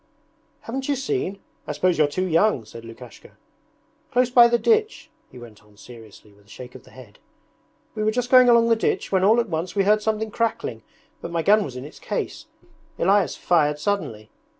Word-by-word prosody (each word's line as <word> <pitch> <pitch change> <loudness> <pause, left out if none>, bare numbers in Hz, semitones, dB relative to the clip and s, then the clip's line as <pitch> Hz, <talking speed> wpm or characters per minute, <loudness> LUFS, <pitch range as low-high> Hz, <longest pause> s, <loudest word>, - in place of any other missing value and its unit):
'Haven't 265 +4 -6
you 285 - +1
seen? 270 - -3 0.3
I 150 - -3
suppose 175 +3 0
you're 150 - +4
too 185 +6 -3
young!' 165 - +1
said 115 +2 -12
Lukashka. 115 +1 -14 0.7
'Close 250 0 +1
by 240 -1 +7
the 235 0 +1
ditch,' 440 - 0 0.2
he - - -15
went 115 -4 -14
on 105 -1 -24
seriously 110 -2 -15
with 100 0 -25
a - - -24
shake 125 +2 -11
of 130 - -14
the - - -18
head. 125 -6 -16 0.7
'We 215 -1 -3
were 215 - +2
just 245 +2 -3
going 255 -1 +7
along 235 -1 +4
the 230 - +4
ditch 225 - -2
when 190 -1 +1
all 220 +4 +4
at 235 - -1
once 165 +3 -4
we 200 - +2
heard 210 +2 +2
something 220 0 -2
crackling, 230 +1 -3 0.4
but - - -6
my 170 -1 -2
gun 210 +3 +4
was 130 -9 -8
in 125 +1 -7
its 150 - -13
case. - - -5 0.5
Elias 195 +1 +1
fired 150 -4 +1
suddenly 150 - -4
185 Hz, 200 wpm, -22 LUFS, -, 0.7 s, by